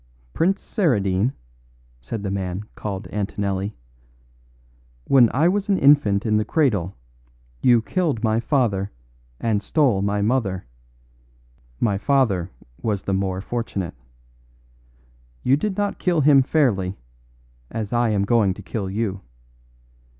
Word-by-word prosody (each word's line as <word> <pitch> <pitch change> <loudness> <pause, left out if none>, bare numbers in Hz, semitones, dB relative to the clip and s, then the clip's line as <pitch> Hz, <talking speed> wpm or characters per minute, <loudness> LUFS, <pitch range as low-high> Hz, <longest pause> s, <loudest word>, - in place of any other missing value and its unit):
"Prince 190 +4 +1
Saradine," 110 - +1 0.7
said 100 - -5
the 100 - -2
man 95 0 -3
called 100 -2 -5
Antonelli, 100 -1 -2 1.3
"when 125 - +5
I 150 +6 +3
was 200 +3 0
an 195 - +3
infant 135 - +4
in 110 -1 +2
the 105 - +1
cradle 105 - 0 0.7
you 120 -3 +4
killed 155 - -1
my 110 0 +2
father 115 -7 0 0.5
and 110 -3 0
stole 120 -2 +2
my 100 0 0
mother; 105 - 0 1.1
my 100 -4 +1
father 110 - +1 0.3
was 105 -4 -1
the 100 - -2
more 95 -1 -1
fortunate. 100 -5 -4 1.5
You 130 - +4
did 190 +6 -2
not 205 0 -1
kill 175 -4 +1
him 140 -1 +6
fairly, 115 - +1 0.7
as 110 -2 -4
I 120 -1 +2
am 100 -2 +1
going 105 -4 +2
to - - -11
kill 100 -4 -4
you. 100 -1 -2
110 Hz, 125 wpm, -22 LUFS, 100-135 Hz, 1.5 s, him